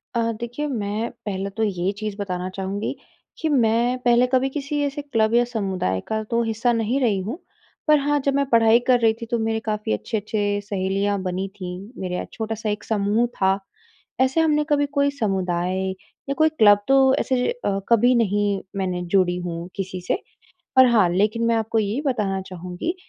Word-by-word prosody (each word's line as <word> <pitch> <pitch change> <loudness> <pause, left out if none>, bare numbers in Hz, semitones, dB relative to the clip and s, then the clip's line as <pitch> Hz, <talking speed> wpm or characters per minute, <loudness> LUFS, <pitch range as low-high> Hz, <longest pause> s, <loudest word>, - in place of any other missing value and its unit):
अ, 230 -1 +1
देखिए, 240 +5 -4
मैं 220 -3 -2 0.2
पहले 195 -1 -3
तो 220 - 0
ये 190 -3 0
चीज़ 215 -1 -4
बताना 185 -2 -3
चाहूँगी 195 +6 -3 0.4
कि 320 - -1
मैं 235 +3 +2
पहले 245 0 +4
कभी 260 +1 +3
किसी 290 +1 -3
ऐसे 285 +1 -3
क्लब 225 -6 0
या 240 - +5
समुदाय 190 - -2
का 220 0 -1
तो 235 0 +2
हिस्सा 225 +2 0
नहीं 230 +3 0
रही 230 -7 +2
हूँ। 220 - -4 0.5
पर 305 0 +6
हाँ, 290 +1 +1
जब 280 0 0
मैं 280 0 +2
पढ़ाई 230 -1 +5
कर 250 -1 +5
रही 225 -1 +4
थी, - - -3
तो 235 +1 -1
मेरे 225 0 0
काफ़ी 210 - -1
अच्छे-अच्छे 205 - -1
सहेलियाँ 200 0 -1
बनी 185 +1 -2
थीं, 185 +1 -7
मेरा 180 -1 -3
छोटा-सा 220 -1 -3
एक 210 +1 -3
समूह 215 +2 +1
था। 190 0 +2 0.6
ऐसे 265 +5 +3
हमने 300 -2 +3
कभी 290 -1 +3
कोई 280 0 +4
समुदाय 185 -6 -1 0.5
या - - +1
कोई 315 0 +5
क्लब 210 -9 +5
तो 270 -1 +5
ऐसे 255 -2 0
अ, 340 - -2
कभी 240 +2 +5
नहीं, 205 -3 +1
मैंने 185 -2 -2
जुड़ी 180 -2 +3
हूँ, 175 -1 -5
किसी 190 -1 -4
से। 385 - 0 0.6
पर 260 0 +8
हाँ, 210 -6 +4
लेकिन 210 +6 +1
मैं 230 0 +3
आपको 225 0 0
ये 215 +4 0
बताना 210 -7 0
चाहूँगी 180 - -4
220 Hz, 180 wpm, -23 LUFS, 195-245 Hz, 0.6 s, पर